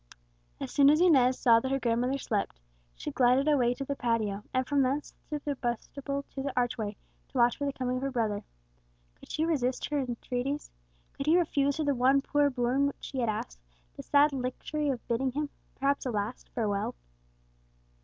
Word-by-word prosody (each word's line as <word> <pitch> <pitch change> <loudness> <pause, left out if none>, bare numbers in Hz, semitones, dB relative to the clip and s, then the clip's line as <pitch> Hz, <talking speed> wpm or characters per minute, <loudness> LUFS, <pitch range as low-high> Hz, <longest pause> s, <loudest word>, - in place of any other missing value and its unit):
As - - -5
soon 280 -1 +6
as 305 +2 +5
Inez 265 -8 +5
saw 230 -2 +5
that 260 - -3
her 270 0 +1
grandmother 245 +2 +1
slept, 205 - -2 0.4
she - - -5
glided 255 +3 +3
away 250 -5 +3
to 275 - -5
the 280 - -2
patio, 220 -5 0
and 255 0 +1
from 285 0 +2
thence 270 +3 -1 0.2
through 300 -1 -3
the 290 - 0
vestibule 275 +3 -3
to 270 - -4
the 275 +1 -2
archway, 225 -4 -1 0.3
to 275 - -7
watch 240 -1 +4
for 285 - -2
the 280 - -1
coming 255 -1 -2
of - - -4
her 275 - -1
brother. 220 -5 -1 0.8
Could - - -13
he 315 - 0
resist 265 -5 -1
her 295 - +1
entreaties? 250 +2 -3 0.4
could 275 - -5
he 325 +3 +6
refuse 285 -5 +1
her 315 - 0
the 285 -1 +2
one 265 +2 +4
poor 290 0 +2
boon 255 +2 +1
which 280 - -5
she 270 - -5
had 235 -3 +1
asked, - - -4 0.4
the - - -7
sad 290 +1 +4
luxury 275 +3 -2
of 250 -4 -3
bidding 250 +2 0
him 295 +1 -2 0.2
perhaps 275 0 0
a - - 0
last 215 +1 -3
farewell? 205 - -1
260 Hz, 195 wpm, -29 LUFS, 240-280 Hz, 0.8 s, soon